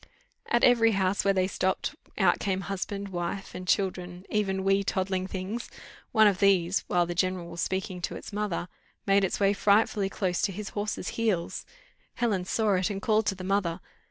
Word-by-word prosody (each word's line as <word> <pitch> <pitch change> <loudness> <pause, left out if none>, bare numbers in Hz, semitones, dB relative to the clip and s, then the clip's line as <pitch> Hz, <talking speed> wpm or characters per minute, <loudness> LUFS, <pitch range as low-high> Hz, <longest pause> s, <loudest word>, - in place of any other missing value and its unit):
At 235 - +2
every 230 -2 +5
house 190 0 +1
where 195 - +3
they 185 -1 +3
stopped, 190 0 -1 0.2
out - - +3
came 190 -2 -1
husband, 195 +1 -4
wife, 175 +2 -4
and 180 0 -7
children, 180 -2 -1
even 195 -2 0
"wee 195 +1 +3
toddling 190 -1 -1
things;" 195 +5 -5 0.4
one 220 -2 +6
of 200 -3 +3
these, 190 -2 +3
while 175 -1 +2
the 175 - -3
general 180 -1 -1
was 170 - -4
speaking 190 -1 -2
to - - -3
its - - -9
mother, 205 -4 -2 0.4
made 200 0 +4
its 190 - 0
way 200 0 +4
frightfully 205 0 +2
close 185 -3 -1
to 200 - +1
his 205 +2 -6
horse's 210 0 -3
heels: 210 -7 -1 0.5
Helen 205 -7 0
saw 215 +1 +1
it, 185 +2 0
and 200 -2 -3
called 215 +1 +1
to 195 - +1
the 185 - -8
mother. 185 -3 0
195 Hz, 185 wpm, -28 LUFS, 185-205 Hz, 0.5 s, one